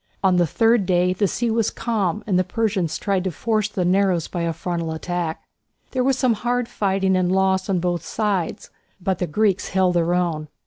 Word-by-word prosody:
On 185 -2 +4
the 175 -1 +3
third 225 +3 +2
day 180 0 +2
the 200 +2 +1
sea 235 +4 -1
was 225 -1 +1
calm 210 -4 -2
and 185 -4 +1
the - - +3
Persians 190 -4 -1
tried 195 -3 0
to - - +1
force 215 +5 0
the 190 -4 -2
narrows 185 -2 +2
by 175 - -4
a 170 0 0
frontal 165 0 -3
attack. 170 0 -3 0.5
There 255 -1 0
was 265 0 +2
some 255 -3 +3
hard 245 +2 -1
fighting 195 -2 0
and 180 -1 +1
loss 190 0 +1
on 190 - +2
both 175 -1 -1
sides, 205 -6 -2 0.3
but 190 -1 -1
the 180 - -1
Greeks 205 +3 +1
held 185 -1 +2
their 175 0 +1
own. 165 -4 -1
190 Hz, 205 wpm, -22 LUFS, 175-210 Hz, 0.5 s, On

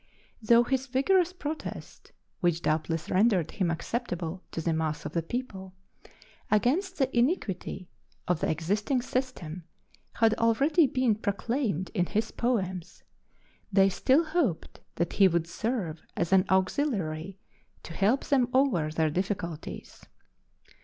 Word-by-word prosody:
Though 235 +2 +5
his 265 +1 -1
vigorous 340 +8 +2
protest 315 -4 -7 0.3
which 170 -1 +1
doubtless 160 +1 -1
rendered 190 -4 +3
him 185 -4 0
acceptable 180 -2 -3
to - - -5
the 165 0 0
mass 155 -2 -2
of 150 - -5
the 170 - +1
people 190 -2 -6 0.7
against 300 - +1
the 265 -3 0
iniquity 230 - -1 0.4
of 180 -3 +1
the - - 0
existing 205 - 0
system 185 -12 -4 0.5
had 225 -1 +3
already 275 +8 +4
been 255 -3 +2
proclaimed 205 - -2
in 180 -5 +1
his 215 +1 -1
poems, 190 -8 -2 0.7
they 195 0 +5
still 265 - +3
hoped 310 - -1 0.2
that 170 - -1
he 195 - +6
would 170 -2 +1
serve 175 -4 -3 0.2
as 170 - 0
an 185 -1 +5
auxiliary 190 - 0 0.5
to 165 - -8
help 210 +10 +2
them 255 -4 +2
over 240 - +3
their 155 0 0
difficulties. 175 -2 -4
200 Hz, 130 wpm, -28 LUFS, 170-255 Hz, 0.7 s, he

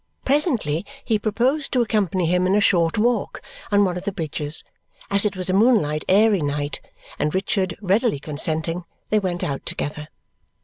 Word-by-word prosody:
Presently 255 - +2 0.2
he 220 -3 +1
proposed 255 +8 0
to 250 - +3
accompany 195 -5 0
him 180 +2 +2
in 190 - +2
a - - +4
short 170 -4 +2
walk 235 +3 0 0.3
on 205 0 +4
one 180 -1 -1
of 180 - -6
the 200 - -2
bridges, 155 -4 -3 0.5
as 200 +1 +5
it 200 - -5
was 185 0 -4
a 185 - 0
moonlight 195 -9 +3
airy 205 0 +4
night; 145 0 -2 0.4
and 150 +2 0
Richard 190 -2 -1
readily 205 - +2
consenting, 160 +4 -2 0.3
they 215 - +4
went 180 -3 -2
out 140 -2 -3
together. 150 +1 -4
185 Hz, 170 wpm, -22 LUFS, 160-215 Hz, 0.5 s, as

